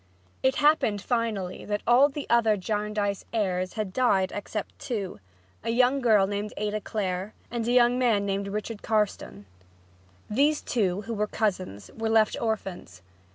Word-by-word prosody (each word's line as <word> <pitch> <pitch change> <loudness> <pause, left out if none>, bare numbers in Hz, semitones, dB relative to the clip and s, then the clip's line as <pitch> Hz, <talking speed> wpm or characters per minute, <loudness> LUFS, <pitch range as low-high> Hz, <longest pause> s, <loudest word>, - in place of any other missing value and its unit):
It 265 0 +2
happened, 295 -9 +3
finally, 215 -5 -2
that 205 0 -3
all 255 +4 +6
the 290 0 -6
other 225 -3 +3
Jarndyce 210 0 -2
heirs 185 -5 -1
had 210 -4 -3
died 195 -7 +2
except 205 0 -5
two, 200 - -4 0.4
a - - -3
young 250 +3 +3
girl 215 -5 +5
named 205 +1 -4
Ada 210 0 -2
Clare 195 -1 -3 0.2
and 235 -1 -2
a - - +2
young 245 0 +4
man 225 -5 +2
named 200 0 -1
Richard 210 +2 -4
Carstone. 210 - -1 0.8
These 290 +7 +2
two, 200 -5 0
who 230 +2 -5
were 210 -1 0
cousins, 185 - -2
were 225 0 -2
left 220 -1 +3
orphans. 190 - -4
210 Hz, 155 wpm, -27 LUFS, 200-235 Hz, 0.8 s, all